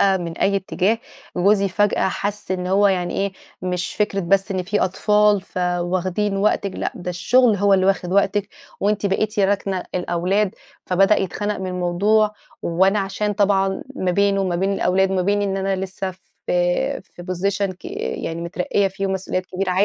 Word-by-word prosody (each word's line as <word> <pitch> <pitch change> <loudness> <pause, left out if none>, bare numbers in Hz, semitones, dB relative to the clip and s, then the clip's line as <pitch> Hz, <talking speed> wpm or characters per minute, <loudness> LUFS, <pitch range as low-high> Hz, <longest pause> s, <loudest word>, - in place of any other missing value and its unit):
آآ 195 -1 +4
من 170 -2 -5
أي 200 0 +2
اتجاه 195 +3 0 0.4
جوزي 200 +2 +3
فجأة 205 0 +1
حس 205 +1 -4
إن 180 -1 -1
هو 200 +2 +4
يعني 180 -2 -1
إيه، 195 0 -1 0.3
مش 180 -1 -2
فِكرة 205 -2 0
بس 195 +3 +1
إن 185 -2 -1
في 205 +3 -1
أطفال 210 +2 +3
فواخدين 185 +2 -1
وقتِك، 200 -1 +1
لأ - - -2
ده 180 0 -5
الشغل 230 +5 +3
هو 200 0 +4
اللي 190 0 +2
واخد 185 -2 +1
وقتِك، 200 0 +2 0.3
وأنتِ 205 0 +1
بقيتِ 210 +2 -1
راكنة 195 -1 0
الأولاد، 180 +3 0 0.3
فبدأ 195 +3 +4
يتخنق 205 +2 -2
من 190 - -4
الموضوع، 185 +4 +2 0.3
وأنا 190 +5 +2
عشان 200 +2 -1
طبعًا 195 -1 +1
ما 185 -1 0
بينه 200 +1 +2
وما 180 -2 0
بين 195 +2 0
الأولاد 190 0 +2
وما 185 -1 +1
بين 205 +2 +1
إن 195 -1 -1
أنا 195 0 0
لسّه 190 0 -4 0.4
في 175 0 +1
في 175 - -13
position 195 +2 -1
ك - - -28 0.4
يعني 165 +1 -3
مترقية 180 +3 0
فيه 195 +1 -3
ومسؤوليات 185 -1 -2
كبيرة 185 0 -2
ع 185 +3 +3
195 Hz, 170 wpm, -21 LUFS, 185-200 Hz, 0.4 s, آآ